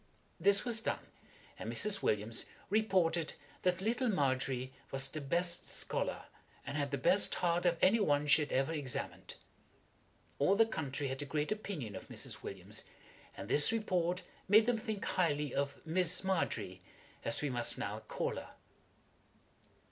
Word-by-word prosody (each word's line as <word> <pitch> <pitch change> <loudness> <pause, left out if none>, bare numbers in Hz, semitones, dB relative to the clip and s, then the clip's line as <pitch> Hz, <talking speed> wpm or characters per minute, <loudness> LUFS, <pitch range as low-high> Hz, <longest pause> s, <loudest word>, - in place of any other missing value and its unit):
This 200 +2 +4
was 230 -2 +2
done, - - -3 0.5
and - - -4
Mrs. 210 -2 +2
Williams 105 +2 0 0.3
reported 185 -6 +1 0.3
that 180 0 +1
little 240 +4 0
Margery 130 - 0 0.2
was 135 0 +2
the 155 +3 -5
best 170 +5 +1
scholar, - - -1 0.4
and 140 - -5
had 145 -1 -1
the 140 - -2
best 190 +9 +4
heart 175 0 +1
of 170 -1 +2
any 215 +5 +5
one 145 -7 +2
she 150 +2 +5
had 150 - -3
ever 135 +4 +1
examined. 145 -5 -3 1.0
All 165 +8 +4
the 225 +2 +5
country 145 -8 -3
had 135 +2 -3
a - - -4
great 150 +3 -2
opinion 180 - -4
of - - -8
Mrs. - - -5
Williams, - - -5 0.5
and - - -7
this 150 - +5
report 180 -5 0 0.2
made 215 +3 +6
them 240 -1 +1
think 215 -3 -4
highly 150 -6 0
of 140 +2 -3
Miss 180 +2 +2
MARGERY, 115 - -1 0.4
as 115 - -1
we 145 - 0
must 120 -1 +3
now - - -4
call - - -3
her. - - -9
165 Hz, 155 wpm, -34 LUFS, 140-195 Hz, 1.0 s, made